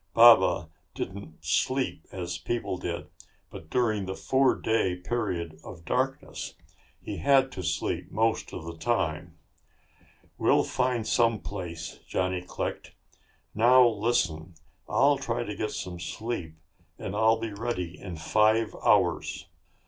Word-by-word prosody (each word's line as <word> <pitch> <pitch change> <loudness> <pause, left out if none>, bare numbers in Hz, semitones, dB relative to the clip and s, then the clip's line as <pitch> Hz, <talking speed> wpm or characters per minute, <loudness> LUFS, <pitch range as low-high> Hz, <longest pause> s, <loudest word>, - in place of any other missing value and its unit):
Baba 95 -7 +7 0.2
didn't 95 -4 -7
sleep 130 -10 0
as 90 -3 -4
people 120 -5 -2
did, 85 -1 -4 0.4
but 80 - -10
during 110 -5 +1
the 95 - -3
four 135 +4 +3
day 110 -5 +1
period 90 -5 -3
of 85 0 -11
darkness 135 - -2 0.4
he - - -6
had 135 -1 +4
to 95 - -6
sleep 80 - -2
most 115 +1 0
of 80 - -7
the 85 0 -6
time. 80 -5 -1 1.0
"We'll - - +4
find 125 -3 0
some 115 -2 +2
place," 85 -4 -6
Johnny 95 -1 -1
clicked. 90 - -5 0.6
"Now, 125 +3 +6
listen. 100 -8 0 0.3
I'll 140 -1 +4
try 120 -4 -2
to 105 - -5
get 105 +1 -2
some 90 -1 -5
sleep 90 -4 -4 0.4
and 100 - -5
I'll 110 +1 +4
be 115 -2 -4
ready 100 -5 -4
in 90 -3 -7
five 110 +7 +2
hours. - - +2
105 Hz, 130 wpm, -28 LUFS, 90-120 Hz, 1.0 s, Baba